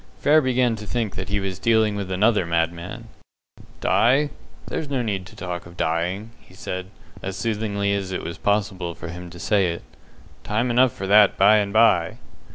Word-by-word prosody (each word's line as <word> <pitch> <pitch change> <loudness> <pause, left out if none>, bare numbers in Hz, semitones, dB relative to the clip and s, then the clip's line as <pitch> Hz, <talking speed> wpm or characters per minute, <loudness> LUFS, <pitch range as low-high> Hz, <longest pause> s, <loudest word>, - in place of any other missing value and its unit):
Frere 155 +2 +4
began 125 -3 +1
to 105 -1 -9
think 115 -3 -2
that 95 0 -5
he 100 0 0
was 95 -1 -4
dealing 110 -2 +2
with 100 -2 -4
another 105 +2 +2
madman. 85 +1 -2 0.7
"Die! 140 +5 +3 0.3
There's 150 - -4
no 135 -3 -1
need 100 -5 -3
to - - -15
talk 90 -1 -6
of 85 0 -15
dying," 90 +7 -1
he - - -20
said, 95 0 -5 0.3
as 95 0 -5
soothingly 105 -3 -1
as 100 -2 -3
it 95 - -3
was 85 - -6
possible 100 -4 -1
for - - -8
him 90 +1 -8
to 85 - -12
say 100 +1 +2
it. 85 -4 -4 0.6
"Time 115 +4 0
enough 125 +1 +4
for 95 - -6
that 105 +1 +5
by 105 +3 +6
and 100 -1 0
by." 100 -6 +3
100 Hz, 185 wpm, -23 LUFS, 90-110 Hz, 0.7 s, by